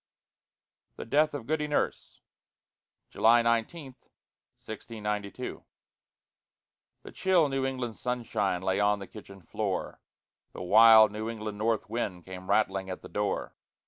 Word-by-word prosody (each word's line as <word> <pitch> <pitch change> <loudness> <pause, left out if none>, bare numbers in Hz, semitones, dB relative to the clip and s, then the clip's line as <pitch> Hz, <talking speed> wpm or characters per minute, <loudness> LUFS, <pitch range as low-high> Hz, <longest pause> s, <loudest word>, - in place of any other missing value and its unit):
THE - - -7
DEATH 150 +5 +2
OF 130 -6 -6
GOODY 150 +1 -1
NURSE 150 - -2 0.9
[July 115 +1 +4
19, 115 +5 -1 0.6
1692] 105 -2 -6 1.4
The - - -10
chill 180 -5 +2
New 135 -1 -1
England 125 -4 -4
sunshine 110 -7 -2
Lay 95 +1 0
on 105 0 +3
the 100 - -8
kitchen 100 -2 -13
floor; - - -4 0.5
The - - -7
wild 110 +2 +7
New 110 +2 -4
England 105 -2 -6
north 110 -1 0
wind 105 -6 -4
Came 95 0 -9
rattling 95 -2 +1
at 95 - -6
the - - -10
door. 105 0 -2
110 Hz, 125 wpm, -28 LUFS, 100-125 Hz, 1.4 s, wild